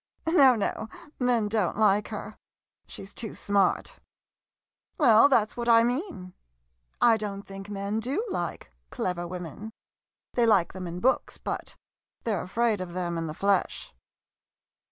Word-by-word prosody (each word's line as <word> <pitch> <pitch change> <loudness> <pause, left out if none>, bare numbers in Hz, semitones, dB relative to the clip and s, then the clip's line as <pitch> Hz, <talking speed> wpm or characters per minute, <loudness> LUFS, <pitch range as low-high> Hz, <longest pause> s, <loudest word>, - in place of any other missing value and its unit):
No, 285 -6 +6
no 220 +1 -3
— 295 - -20
men 245 -4 +2
don't 205 -4 0
like 210 -1 +3
her - - -7 0.3
— - - -53
she - - -8
's 195 - -11
too 220 -3 -4
smart. 200 -2 0 1.0
Well, 240 -4 +6
that 215 -5 +3
's - - -13
what 240 0 -1
I 230 0 +7
mean. 245 - -3 0.7
I 230 -2 +5
don't 200 -2 -5
think 195 0 -10
men 200 +1 -2
do 275 - -2
like 175 - -4 0.2
clever 175 - -3
women. 180 +5 -7 0.6
They 240 -1 +3
like 195 -6 +3
them 185 -1 -6
in 175 +1 -6
books, 260 - +1
but - - -5 0.5
they're 210 -6 -1
afraid 220 +1 0
of 175 -2 -6
them 175 -1 -2
in 165 -1 -3
the 155 - -6
flesh. 200 - 0
210 Hz, 155 wpm, -27 LUFS, 185-235 Hz, 1.0 s, I